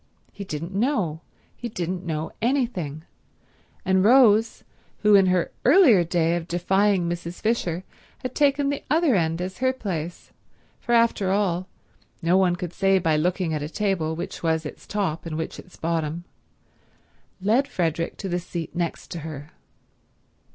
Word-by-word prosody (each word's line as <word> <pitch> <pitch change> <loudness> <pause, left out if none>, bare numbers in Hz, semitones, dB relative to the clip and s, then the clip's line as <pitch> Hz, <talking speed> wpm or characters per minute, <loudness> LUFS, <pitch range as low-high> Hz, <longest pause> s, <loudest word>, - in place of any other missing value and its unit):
He 200 - -8
didn't 165 0 -5
know; 200 - 0 0.3
he 240 - -6
didn't 180 -2 -3
know 160 -2 -3
anything—and 190 - -3
Rose, 225 -1 +5 0.4
who 210 0 +5
in 195 -2 +6
her 180 -2 +1
earlier 260 - +6
day 170 0 +1
of 170 -1 -4
defying 190 +1 +2
Mrs. 175 0 -5
Fisher 185 -6 -1 0.4
had 255 -1 -4
taken 285 -1 +2
the 285 - -3
other 315 -1 +3
end 165 -3 +1
as 185 +1 -6
her 260 0 +3
place, 175 -9 -5 0.5
for 240 - -2
after 230 -5 +3
all 185 -2 0 0.5
no 170 +2 +2
one 185 -2 +3
could 175 -1 -6
say 195 0 +3
by 165 -4 +2
looking 175 +1 0
at 150 - -2
a 150 - -4
table 175 -5 -1
which 175 +4 -6
was 160 -1 0
its 150 - -9
top 185 -6 -2
and 155 -1 -4
which 160 - -4
its 180 - -14
bottom, 165 0 -2 1.2
led 225 +9 +2
Frederick 165 - -2
to 195 - -5
the 175 -1 -1
seat 170 -1 -6
next 170 -2 -3
to 170 - -4
her. 150 -1 -8
180 Hz, 155 wpm, -24 LUFS, 165-210 Hz, 1.2 s, in